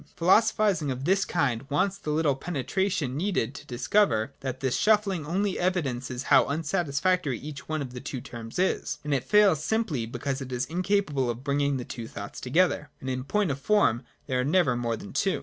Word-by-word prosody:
Philosophising 190 -3 +3
of 130 +1 -3
this 190 +2 +3
kind 140 -6 -1
wants 185 +7 +1
the 155 - -6
little 150 -1 +2
penetration 150 +1 -2
needed 160 - -1
to 145 - -11
dis 125 +1 -5
cover, 130 - +3
that 130 -1 -4
this 130 -3 0
shuffling 200 -7 +2
only 195 +3 0
evidences 135 -8 -1
how - - +5
unsatisfac 165 +3 0
tory 140 -7 -2
each 140 +2 -9
one 155 -2 -1
of 125 -2 -8
the 125 - -7
two 135 -1 -5
terms 115 -1 -8
is. 180 -5 0
And 150 -1 -1
it 130 -3 +1
fails 200 -8 +4
simply 160 - -1
because 130 +3 -3
it 130 -1 -7
is 125 +1 -1
incapable 170 -6 0
of 120 +2 -4
bringing 140 -1 +1
two 115 -2 -7
thoughts 100 -1 -8
together. 150 +2 +1
(And 130 - -4
in 130 0 -3
point 205 +1 +1
of 140 - -4
form 145 - +3 0.2
there 130 -1 -1
are - - +2
never 150 -2 +3
more 120 -1 -1
than 100 - -10
two.) 195 - +1
145 Hz, 200 wpm, -27 LUFS, 130-185 Hz, 0.2 s, how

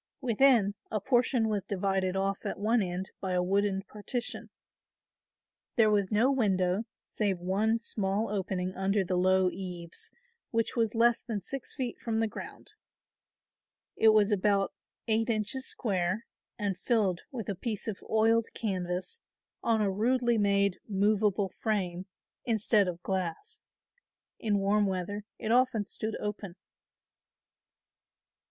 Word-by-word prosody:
Within, 240 -4 +4 0.2
a 215 - -1
portion 245 +1 +2
was 210 -2 0
divided 190 -1 -1
off 195 0 -1
at - - -3
one 220 +4 +2
end 185 0 -3
by 190 -1 -2
a 180 0 +2
wooden 195 +1 +1
partition. 215 +4 -4 1.3
There 220 -3 +5
was 200 -2 +1
no 230 +6 +4
window 195 -5 +1 0.2
save 200 -4 -1
one 200 +6 +1
small 210 -2 -1
opening 185 -2 -2
under 195 +1 +1
the 185 0 -1
low 185 0 +3
eaves 175 -3 -5 0.4
which 230 -1 0
was 230 -2 +1
less 235 +1 +4
than 210 -5 -4
six 270 +5 -5
feet 255 -4 -3
from 225 -1 -1
the 225 - +2
ground. - - -9 1.2
It 225 - +3
was 215 -1 +4
about 200 0 +2 0.3
eight 225 +1 +1
inches 225 +4 0
square 195 -1 0 0.3
and 200 -3 -2
filled 205 -8 +1
with 235 -6 -5
a 200 - -1
piece 210 +3 -4
of 210 -3 -4
oiled 225 +1 +3
canvas 185 - -2 0.4
on 225 -2 +2
a 200 - +1
rudely 240 +3 +2
made 200 -2 +2
movable 205 -1 +2
frame 190 -4 -2 0.4
instead 215 -3 +2
of 175 -1 -5
glass. 190 - -3 0.8
In 210 -3 +1
warm 200 +1 +2
weather 195 +2 -3
it 220 - -3
often 245 -3 +3
stood 215 +2 -4
open. 210 -3 -5
205 Hz, 135 wpm, -30 LUFS, 190-225 Hz, 1.3 s, There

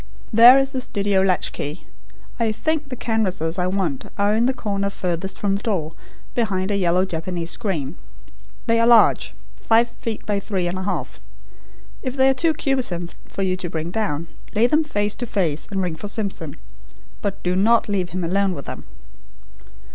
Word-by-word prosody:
"There 235 +4 +9
is 270 0 +2
the 260 -2 -2
studio 200 -5 +1
latch 190 -1 +2
key. 145 +1 -5 0.5
I 230 -2 +2
think 305 +5 -1
the 255 - -4
canvases 190 -8 -1
I 180 - +1
want 185 -8 -1
are 205 +1 +2
in 225 +2 +3
the 260 - +3
corner 200 -4 -1
furthest 185 -1 -3
from 200 -1 0
the 200 - -3
door, 170 -9 -2 0.4
behind 200 -4 0
a - - +1
yellow 180 -1 +2
Japanese 170 -1 -3
screen. 180 - -3 0.7
They 230 0 +3
are 230 - +4
large 235 -2 +5 0.2
five 230 +1 +3
feet 230 -1 -6
by 205 -1 0
three 190 -3 -2
and 180 +2 -2
a - - -4
half. 195 - -3 0.8
If 255 0 -4
they 265 0 +5
are - - +4
too 320 +4 +1
cumbersome 250 - 0 0.2
for 195 - -3
you 185 -1 +1
to 180 -2 -4
bring 160 +1 -4
down, 170 -7 -2 0.3
lay 220 +3 +4
them 305 +6 +3
face 205 -8 -1
to 245 - -5
face, 165 -8 0
and 195 -2 -1
ring 175 -3 -2
for 205 - -6
Simpson. 200 -8 -3 0.6
But 200 -1 -3
do 180 0 +1
not 225 +5 +4
leave 190 -4 -1
him 180 +1 -3
alone 190 +2 +1
with 140 - -7
them." - - -7
200 Hz, 185 wpm, -22 LUFS, 180-230 Hz, 0.8 s, There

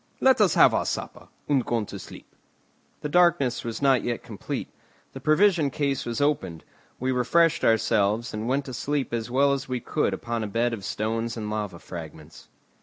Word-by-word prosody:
Let 265 -4 +4
us 195 -5 +4
have - - +6
our - - 0
supper, - - -5 0.2
and 140 -4 +2
go 115 -1 -1
to - - -8
sleep." - - -13 0.7
The - - -2
darkness 155 -7 +3
was 115 +4 -5
not 135 -3 +4
yet 120 -1 -3
complete. 110 -4 -5 0.5
The 135 - -7
provision 155 +2 +3
case 140 -1 -2
was 120 +2 -2
opened; 105 - -1 0.4
we 130 +1 0
refreshed 140 +7 +2
ourselves, 110 0 +2
and 110 +2 -4
went 135 +2 0
to 130 - -7
sleep 140 +1 -2
as 115 0 -2
well 140 +3 +3
as 135 -1 -4
we 125 -1 -1
could - - -1
upon 115 -1 -3
a - - -3
bed 115 +3 0
of 105 -4 -6
stones 115 +3 -2
and 105 -1 -4
lava 105 -4 -3
fragments. 80 -2 -10
120 Hz, 185 wpm, -25 LUFS, 110-140 Hz, 0.7 s, have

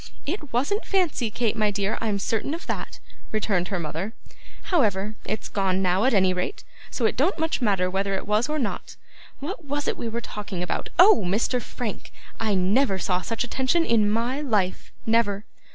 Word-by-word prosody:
'It 300 -2 -4
wasn't 285 - +1
fancy, 345 - +1
Kate, 225 0 0
my 215 -2 +2
dear, 200 0 -1
I'm 215 -3 0
certain 225 +9 -1
of 340 - -9
that,' - - -4 0.3
returned 200 -4 +1
her 195 - -2
mother. 170 +6 -4 0.5
'However, 215 - +1
it's 215 +1 -3
gone 190 -1 0
now 185 +4 +3
at 265 - +3
any 190 -2 +4
rate, 180 - -3 0.3
so 240 - -1
it - - +2
don't 305 +10 +2
much 320 -3 0
matter 195 -5 +2
whether 195 +1 0
it - - -3
was 215 +6 +2
or 305 - 0
not. 240 -8 -3 0.5
What 345 +4 -5
was 290 +1 -2
it - - 0
we 230 - -3
were 230 +1 -2
talking 205 -5 -5
about? 180 - -3
Oh! 370 - +7
Mr. 215 +7 +1
Frank. 225 -1 -5 0.3
I 215 -3 +1
never 195 +4 +3
saw 185 -1 0
such 230 +4 -2
attention 265 +7 +1
in 220 -5 +3
MY 235 +6 0
life, 210 -10 0
never. 220 -3 +2
220 Hz, 185 wpm, -25 LUFS, 195-265 Hz, 0.5 s, Oh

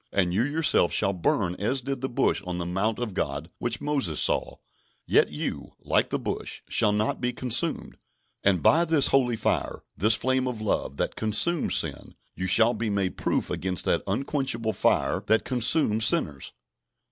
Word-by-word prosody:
And 90 -3 0
you 100 - +1
yourself 145 - +2
shall 100 -2 +1
burn 90 0 0
as 125 +7 -1
did 135 0 -4
the 130 - -2
bush 120 - 0
on 90 -1 -3
the 85 - -4
mount 95 +5 -1
of 120 -4 -4
God 75 -1 -4
which 120 - -1
Moses 140 - 0
saw; - - +1 0.5
yet - - +3
you, - - -5
like - - 0
the - - -1
bush, - - -5
shall 105 - +2
not 105 +3 -1
be 125 0 0
consumed; 125 -1 -1 0.5
and 95 -6 +2
by 165 +2 +5
this 160 -4 +2
holy 125 -3 +2
fire, 110 - -2
this 105 +4 +4
flame 130 +2 0
of 125 -3 -4
love, 105 -9 -2
that - - -2
consumes 110 +11 +1
sin, - - -2 0.2
you 95 - -4
shall 115 +5 +4
be 115 -2 -3
made 100 -2 -1
proof - - -2
against 95 -1 -1
that 85 - +1
unquenchable 115 0 -1
fire - - +1
that 110 0 +2
consumes 120 -3 +2
sinners. 75 -9 -1
110 Hz, 175 wpm, -25 LUFS, 95-130 Hz, 0.5 s, by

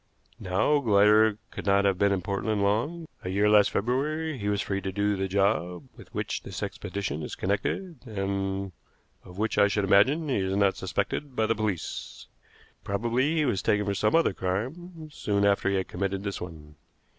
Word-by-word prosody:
Now, 110 +11 +2
Glider 105 -2 +4
could - - -7
not 100 0 +4
have 95 -2 +2
been 100 0 +3
in 95 -2 0
Portland 100 +1 -1
long. 145 +12 0 0.2
A 90 - -4
year 100 +3 +2
last 105 -1 +6
February 150 +8 -1
he 100 0 -1
was 100 -1 0
free 100 -1 -2
to 95 - -3
do 100 +1 0
the 95 0 -1
job 95 -3 0
with - - -15
which - - -3
this - - -6
expedition 95 -7 -4
is - - -5
connected, 125 - -2
and 95 -2 -2 0.5
of 90 - -13
which 110 +2 0
I 100 - +6
should 105 0 0
imagine 130 +12 +4
he 135 - +1
is 95 0 -1
not 100 -1 +3
suspected 140 -3 -3
by 110 - +2
the 115 - +2
police. 105 -6 -4 0.6
Probably 120 +9 0
he 155 -2 +2
was 110 -8 0
taken 105 0 +1
for 100 - 0
some 105 - +1
other 165 -11 +3
crime 155 - -4
soon 100 -7 0
after 100 -1 +2
he 100 - +1
had 95 -1 -1
committed 95 +1 -3
this 100 -1 -4
one. 75 -3 -9
100 Hz, 190 wpm, -27 LUFS, 95-115 Hz, 0.6 s, last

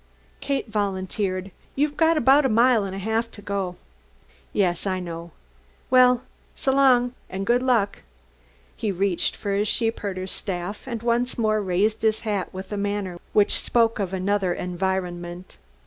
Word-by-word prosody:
Kate 275 -3 -2
volunteered: 195 -2 -2 0.2
"You've 295 +2 +1
about 300 -3 +5
a 265 - +2
mile 235 0 +4
and 190 -1 -5
a - - -5
half 220 +4 -1
to - - -13
go." 200 -3 -3 0.8
"Yes, 185 -1 0
I 185 -1 0
know. 170 -1 -6 0.6
Well 250 -1 +6 0.3
s'long, 265 -2 +3 0.2
and 190 +1 -4
good 240 +3 +3
luck!" 235 -6 +1 0.7
He 215 -3 -2
reached 190 -1 0
for 200 - -4
his 205 +2 +1
sheepherder's 200 -5 -1
staff 190 +4 -4
and 235 -3 -4
once 240 +1 +1
more 215 -2 +2
raised 200 +3 +1
his 220 -1 +2
hat 205 -4 -2
with 190 +2 -8
a - - -2
manner 200 -3 -2
which 210 -1 +3
spoke 230 -2 +2
of 190 -3 -1
another 190 -1 0
environment. 180 -1 -3
205 Hz, 150 wpm, -24 LUFS, 185-235 Hz, 0.8 s, Well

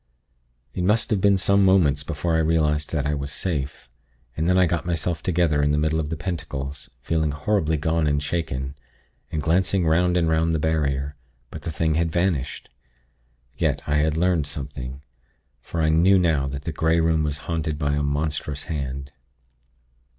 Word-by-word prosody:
"It 90 - -2
must 105 +6 +2
have 100 -3 +2
been 100 0 +4
some 100 +1 +3
moments 85 -7 +4
before 75 +4 -2
I 80 - +3
realized 75 -2 +1
that 75 -3 -1
I 75 - 0
was 70 -1 -3
safe; 70 -9 -3 0.5
and 80 +2 -1
then 90 - +4
I 95 - +5
got 85 0 -1
myself 85 -2 -1
together 85 -5 +1
in 70 - +2
the 75 - +2
middle 80 +1 +1
of 75 -2 -2
the 80 - -3
pentacles, 75 -5 -5
feeling 80 -2 0
horribly 80 +2 0
gone 80 +1 +1
and 75 0 +2
shaken, 70 -4 -3 0.6
and 75 -2 -2
glancing 90 +3 +2
'round 90 +2 +3
and 85 -2 +2
'round 80 +1 +2
the - - 0
barrier; 70 -3 0 0.4
but - - -7
the - - -4
thing 80 0 0
had 80 +1 +1
vanished. 85 -6 -1 0.9
Yet, - - 0
I 75 0 +1
had 75 +1 +1
learnt 85 -3 +2
something, 70 -2 -7 0.6
for 80 +5 -3
I 80 - +3
knew 85 +5 +5
now 80 -6 +2
that 70 +1 -5
the 80 - -3
Grey 80 +2 +2
Room 80 -1 +2
was 75 -1 -1
haunted 80 -2 -2
by 70 -1 0
a 75 - 0
monstrous 75 0 -2
hand. 70 -3 -4
80 Hz, 180 wpm, -24 LUFS, 75-85 Hz, 0.9 s, I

